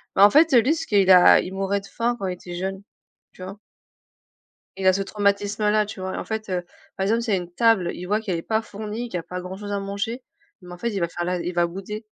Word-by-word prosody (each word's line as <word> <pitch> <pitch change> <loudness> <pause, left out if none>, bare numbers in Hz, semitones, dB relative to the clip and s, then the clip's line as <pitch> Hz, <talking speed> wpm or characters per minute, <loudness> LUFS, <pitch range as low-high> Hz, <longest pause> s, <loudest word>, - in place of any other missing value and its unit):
mais 195 - +3
en 205 - +9
fait, 315 +6 +5
heu, 240 - +8
lui 280 +8 +2
ce 325 - -4
qu'il 200 -3 +2
a 180 -1 +8
il 185 - -5
mourait 195 +1 -1
de 200 - -14
faim 240 +1 -1
quand 195 - -3
il 180 - -2
était 175 0 -10
jeune, 190 +2 -4 0.5
tu 185 - -12
vois? 195 +2 -8 1.2
Il 190 - -3
a 185 - +6
ce 195 - 0
traumatisme-là, 205 +1 0
tu 210 - -8
vois? 185 0 -4
Et - - -4
en - - -4
fait, 220 -2 -5
heu, 180 -1 -1 0.3
par 190 - -1
exemple 225 +4 +1
s'il 220 -3 -1
y - - +3
a - - -3
une 175 0 -10
table, 205 -3 +3
il 180 - -7
voit 210 +3 0
qu'elle 185 -6 -2
est - - -4
pas 220 0 0
fournie, 215 +3 -6
qu'il 180 - -3
y - - -8
pas 180 0 -6
grand 185 +1 -7
chose 205 0 -7
à 200 - -1
manger 200 +5 -4 0.4
mais 180 - -11
en - - -9
fait, 235 - -1
il 200 -3 -3
va 170 - 0
faire 175 +1 -5
la 180 0 -1
il 175 +1 -4
va 175 0 +2
bouder. 195 +5 -7
200 Hz, 285 wpm, -23 LUFS, 185-215 Hz, 1.2 s, en